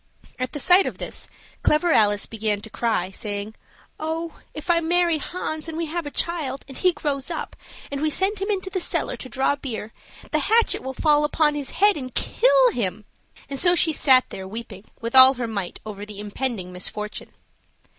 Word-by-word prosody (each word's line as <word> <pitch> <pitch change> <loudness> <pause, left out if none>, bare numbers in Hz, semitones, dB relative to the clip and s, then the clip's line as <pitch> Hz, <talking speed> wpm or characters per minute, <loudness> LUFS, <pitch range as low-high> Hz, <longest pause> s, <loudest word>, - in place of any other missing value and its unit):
At 255 0 -3
the 295 - -4
sight 360 +7 +5
of - - -5
this - - -6 0.3
Clever 330 +3 +3
Alice 205 -6 +3
began 215 -2 -1
to 220 - -11
cry, 220 -5 -1
saying, 205 +1 -5 0.5
"Oh! 320 +1 -4
if 305 - -9
I 335 - +4
marry 340 -1 +2
Hans, 315 -1 -4
and 320 - -5
we 335 - -1
have 325 0 -4
a - - -3
child, 290 -4 -1
and 270 - -10
he 365 - +3
grows 285 -3 -3
up, 335 - -5 0.4
and 280 0 -3
we 310 - +2
send 385 +6 0
him 395 - -2
into 380 -2 -1
the 375 - -1
cellar - - -1
to 255 - -9
draw 265 +4 +1
beer, 225 -5 -6 0.4
the 310 - +2
hatchet 445 +10 +3
will 265 0 -6
fall 300 +1 +3
upon 300 0 +2
his 285 -2 -2
head 410 -1 +3
and 255 -3 -6
kill - - +4
him," 210 - -3 0.4
and 275 -1 -4
so 350 0 +5
she 325 -2 +3
sat 260 -4 +5
there 190 0 -6
weeping 220 -1 -8
with 230 0 -4
all 260 +1 +9
her 245 -1 -3
might 200 -6 -4
over 205 -2 -7
the 210 -1 -8
impending 205 -3 -4
misfortune. 210 +4 -5
275 Hz, 195 wpm, -23 LUFS, 220-335 Hz, 0.5 s, all